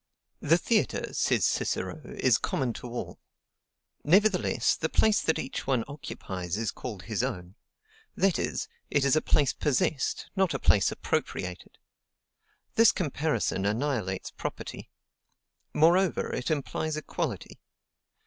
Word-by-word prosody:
The - - +4
theatre, - - 0
says - - +2
Cicero, - - -1
is 120 -4 +2
common 130 -4 -1
to 125 - -8
all; 120 0 -6 0.8
nevertheless, 195 +5 +3
the - - -2
place 215 -1 +3
that 160 - +1
each - - -4
one 130 -4 +2
occupies 95 - -5
is 110 -4 -1
called 105 -7 -7
HIS 110 -2 -2
OWN; 95 -8 -4 0.6
that 195 -2 +2
is, - - -2 0.2
it 140 -1 +2
is 140 - +4
a 155 - +3
place 145 -3 +2
POSSESSED, 140 0 0
not 190 -3 +2
a - - -1
place 100 - +4
APPROPRIATED. 90 -1 -3 1.0
This 225 +1 +6
comparison 145 - -1
annihilates 105 -3 -1
property; - - -6 0.8
moreover, 175 +4 +3
it 125 - -2
implies 155 +1 -2
equality. 155 - -4
135 Hz, 125 wpm, -28 LUFS, 110-160 Hz, 1.0 s, This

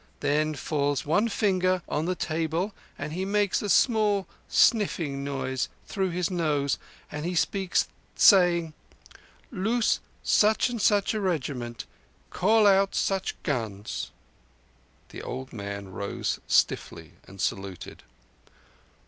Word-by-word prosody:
Then 150 +2 +1
falls 145 -1 -1
one 165 +10 +2
finger 185 -3 +1
on 150 - -1
the 185 +1 0
table 165 +5 -2 0.2
and 150 +2 -5
He 185 +3 -2
makes 205 0 +1
a 205 - -3
small 210 -2 +3 0.2
sniffing 160 - +2
noise 135 -2 -2 0.2
through 190 -3 -1
his 180 +1 -1
nose. 150 -5 0 0.3
Then 150 0 -5
He 175 +2 -2
speaks, 190 +2 +1 0.3
saying: 175 -5 +5 0.8
'Loose 225 +3 +1 0.2
such 215 +3 +3
and 235 -3 -3
such 205 +1 +3
a 215 - -2
regiment. 130 -10 -3 0.5
Call 215 +3 +3
out 195 0 +4
such 195 -1 0
guns.'" 110 -7 -3 1.0
The - - -8
old 130 +1 -6
man 100 -2 -6
rose 100 +2 -3
stiffly - - +1 0.2
and 95 +1 -13
saluted. 95 -1 -4
170 Hz, 120 wpm, -27 LUFS, 140-195 Hz, 1.0 s, saying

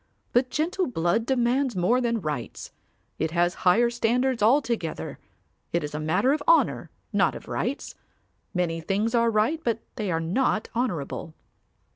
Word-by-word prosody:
But 250 +1 +3
gentle 345 +6 0
blood 220 +1 0
demands 255 -1 +1
more 185 +8 +2
than 235 -2 0
rights. 150 -7 -5 0.5
It 160 - 0
has 175 +2 +1 0.2
higher 235 +6 +4
standards 240 +1 +1
altogether. 230 - +1 0.5
It 170 - 0
is 150 - -5
a 150 - -3
matter 180 - +2
of 305 - -1
honour, - - +3 0.2
not - - +2
of - - -10
rights. - - -3 0.6
Many 170 -3 -1
things 205 +7 0
are 235 -1 +3
right 230 +9 +1
but 230 -1 0 0.2
they 205 -4 -2
are 165 - +1
not 210 +6 0
honourable. 170 - -3
225 Hz, 150 wpm, -26 LUFS, 175-250 Hz, 0.6 s, higher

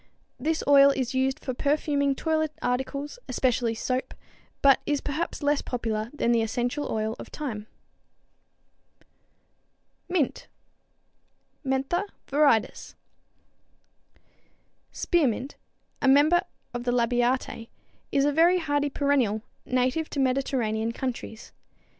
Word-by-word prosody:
This 315 +5 -1
oil 280 -1 +8
is 265 -2 -1
used 265 0 0
for 255 - -1
perfuming 280 0 +1
toilet 315 0 0
articles, 275 - -3
especially 245 -2 +1
soap, 255 +3 -2 0.5
but 275 -1 +6
is 290 -1 +1
perhaps 300 +2 -3
less 290 0 +2
popular 225 -3 -3
than 265 -5 0
the 230 -1 +3
essential 245 +6 -2
oil 220 0 -1
of - - -8
thyme. 220 -8 -5 2.4
=Mint= 345 -7 -1 1.2
(Mentha 270 +8 0 0.2
viridis, 280 -6 +1 1.2
Linn.) - - -33 0.7
Spearmint, 275 - 0 0.5
a 275 - +2
member 295 +6 +5 0.3
of 240 0 -4
the 245 - 0
Labiatæ, 245 0 0 0.4
is 275 0 +3
a 290 - +3
very 335 +5 +4
hardy 290 -3 0
perennial, 265 -7 +1 0.2
native 255 +5 0
to 285 - -4
Mediterranean 250 -4 0
countries. 235 -3 -5
265 Hz, 110 wpm, -26 LUFS, 245-290 Hz, 2.4 s, oil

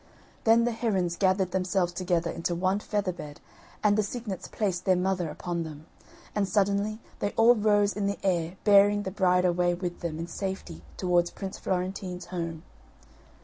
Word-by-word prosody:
Then 230 +1 +6
the 240 - +1
herons 195 -7 0
gathered 190 0 +2
themselves 185 -1 0
together 175 -2 0
into 170 +1 -2
one 185 +3 +1
feather 205 -3 -1
bed 150 -4 -9 0.4
and 205 -1 +4
the 215 - +3
cygnets 210 -2 -5
placed 190 -5 -2
their 185 - +4
mother 180 -2 0
upon 170 +3 -3
them, 155 -1 -7 0.5
and 205 -2 +1
suddenly 205 +2 +1 0.2
they 205 - -1
all 230 +2 +7
rose 205 -2 +3
in 200 -1 -1
the 200 - -1
air 175 -1 0
bearing 205 0 +5
the 190 - -4
bride 180 -2 +3
away 175 0 +2
with 175 -1 -4
them 165 -3 -4
in 165 - -3
safety 190 -2 -5 0.2
towards 175 -2 +2
Prince 195 -1 -7
Florentine's 185 -1 -3
home. 165 -2 -4
185 Hz, 170 wpm, -28 LUFS, 175-205 Hz, 0.5 s, all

